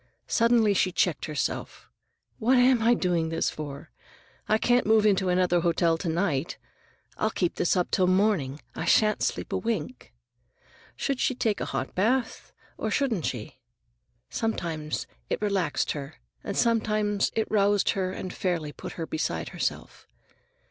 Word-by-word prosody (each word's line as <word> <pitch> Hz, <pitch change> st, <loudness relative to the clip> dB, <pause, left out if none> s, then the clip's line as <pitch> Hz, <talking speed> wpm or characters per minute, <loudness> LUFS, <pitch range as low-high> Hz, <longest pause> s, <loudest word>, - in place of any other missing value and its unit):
Suddenly 230 Hz, -3 st, +3 dB
she 185 Hz, -1 st, +2 dB
checked 180 Hz, -2 st, 0 dB
herself. 150 Hz, -2 st, -4 dB, 0.5 s
"What 250 Hz, +3 st, +3 dB
am 250 Hz, -1 st, +5 dB
I 235 Hz, +2 st, +4 dB
doing 175 Hz, -5 st, 0 dB
this 165 Hz, -, 0 dB
for? 145 Hz, -2 st, -8 dB, 0.6 s
I 215 Hz, -, +4 dB
can't 245 Hz, +1 st, +2 dB
move 220 Hz, -1 st, +4 dB
into 190 Hz, -3 st, +3 dB
another 180 Hz, -1 st, +3 dB
hotel 170 Hz, -1 st, +2 dB
to 170 Hz, -, -2 dB
night. 165 Hz, -3 st, -1 dB, 0.6 s
I'll 215 Hz, -, +1 dB
keep 180 Hz, -5 st, -1 dB
this 175 Hz, -, +1 dB
up 180 Hz, -, 0 dB
till 185 Hz, -2 st, +3 dB
morning. 185 Hz, -8 st, +1 dB
I -, -, -4 dB
shan't 215 Hz, -1 st, +3 dB
sleep -, -, -2 dB
a -, -, +1 dB
wink." 155 Hz, -, -4 dB, 0.8 s
Should 275 Hz, -2 st, -2 dB
she 260 Hz, -, +1 dB
take 225 Hz, -4 st, 0 dB
a -, -, -1 dB
hot -, -, -3 dB
bath, 230 Hz, +5 st, 0 dB, 0.3 s
or 220 Hz, -, -1 dB
shouldn't 225 Hz, -, 0 dB
she? 120 Hz, +1 st, -6 dB, 0.7 s
Sometimes 165 Hz, -9 st, -3 dB, 0.2 s
it -, -, -1 dB
relaxed 195 Hz, -7 st, 0 dB
her, 145 Hz, 0 st, -6 dB, 0.3 s
and 200 Hz, -, -4 dB
sometimes 215 Hz, -3 st, +1 dB
it 220 Hz, -, 0 dB
roused 205 Hz, -1 st, +3 dB
her 190 Hz, -3 st, -1 dB
and 185 Hz, 0 st, -6 dB
fairly 170 Hz, -5 st, -2 dB
put -, -, -8 dB
her 165 Hz, -, -4 dB
beside 155 Hz, 0 st, -2 dB
herself. -, -, -4 dB
190 Hz, 155 wpm, -27 LUFS, 165-220 Hz, 0.8 s, am